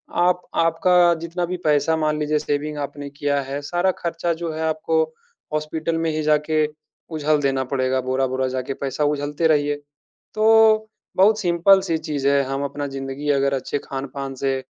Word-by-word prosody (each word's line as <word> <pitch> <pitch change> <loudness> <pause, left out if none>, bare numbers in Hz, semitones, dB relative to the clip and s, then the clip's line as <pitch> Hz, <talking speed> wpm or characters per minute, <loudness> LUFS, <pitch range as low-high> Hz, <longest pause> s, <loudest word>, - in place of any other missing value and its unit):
आप 180 +1 +2
आपका 170 +1 +4
जितना 175 +1 -2
भी 180 +1 -4
पैसा 150 +2 +3
मान 155 -1 0
लीजिए 150 0 +1
सेविंग 150 +1 -2
आपने 145 0 -5
किया 145 0 -1
है, 135 +2 -5
सारा 175 +5 +1
खर्चा 170 0 -1
जो 165 -2 -2
है 160 - -5
आपको 340 - +1 0.5
हॉस्पिटल 155 +2 -2
में 165 0 0
ही 155 0 -2
जाके 155 0 +2 0.5
उझल 150 0 +1
देना 135 -1 +1
पड़ेगा, 130 0 +1
बोरा-बोरा 130 0 0
जाके 130 +1 -3
पैसा 140 +2 -3
उझलते 145 +2 0
रहिए। 145 -1 +2 0.6
तो 220 0 +5 0.3
बहुत 210 +3 +5
सिंपल 180 +2 +4
सी 165 -4 -1
चीज़ 150 -3 -2
है, 140 0 +4
हम 135 +1 -3
अपना 145 +1 -4
ज़िंदगी 135 +2 -5
अगर 140 0 +1
अच्छे 135 +1 -2
खान-पान 135 0 -5
से, 135 0 -1
150 Hz, 165 wpm, -22 LUFS, 140-170 Hz, 0.6 s, तो